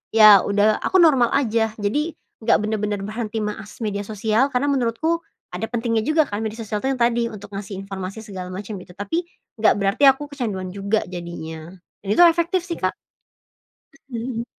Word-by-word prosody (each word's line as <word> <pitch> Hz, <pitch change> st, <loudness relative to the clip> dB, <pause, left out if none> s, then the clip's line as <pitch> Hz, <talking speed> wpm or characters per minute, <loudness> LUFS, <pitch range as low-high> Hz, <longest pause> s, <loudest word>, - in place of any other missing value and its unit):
ya 215 Hz, -2 st, +9 dB
udah 205 Hz, +1 st, +2 dB
aku 375 Hz, -, -2 dB
normal 270 Hz, -8 st, +5 dB
aja. 225 Hz, -4 st, +1 dB
Jadi 290 Hz, +11 st, -1 dB, 0.3 s
nggak 225 Hz, -, +4 dB
bener-bener 210 Hz, -1 st, -1 dB
berhenti 215 Hz, +1 st, -3 dB
mengakses 210 Hz, +2 st, -6 dB
media 205 Hz, -1 st, -2 dB
sosial, 220 Hz, +5 st, +1 dB
karena 275 Hz, +3 st, +1 dB
menurutku 275 Hz, +6 st, 0 dB, 0.3 s
ada -, -, -3 dB
pentingnya 230 Hz, -2 st, -1 dB
juga 310 Hz, 0 st, +4 dB
kan 205 Hz, -, -3 dB
media 220 Hz, -, -4 dB
sosial 210 Hz, -1 st, -3 dB
tuh -, -, 0 dB
yang 250 Hz, -, -6 dB
tadi, 235 Hz, 0 st, +2 dB
untuk 205 Hz, -2 st, -10 dB
ngasih 200 Hz, 0 st, -6 dB
informasi 195 Hz, +2 st, -6 dB
segala 190 Hz, -4 st, -7 dB
macam 200 Hz, +2 st, -6 dB
gitu. 180 Hz, -, -14 dB
Tapi 205 Hz, -, -2 dB, 0.3 s
nggak 220 Hz, -, +5 dB
berarti 200 Hz, +7 st, 0 dB
aku 285 Hz, +2 st, +3 dB
kecanduan 200 Hz, -9 st, -4 dB
juga 200 Hz, +2 st, 0 dB
jadinya, 165 Hz, -3 st, -7 dB, 0.4 s
dan 195 Hz, -, -5 dB
itu 350 Hz, -, +6 dB
efektif 340 Hz, +2 st, 0 dB
sih, 345 Hz, -1 st, -5 dB
Kak. -, -, 0 dB, 1.2 s
Mhm. 235 Hz, 0 st, -3 dB
220 Hz, 175 wpm, -22 LUFS, 200-250 Hz, 1.2 s, ya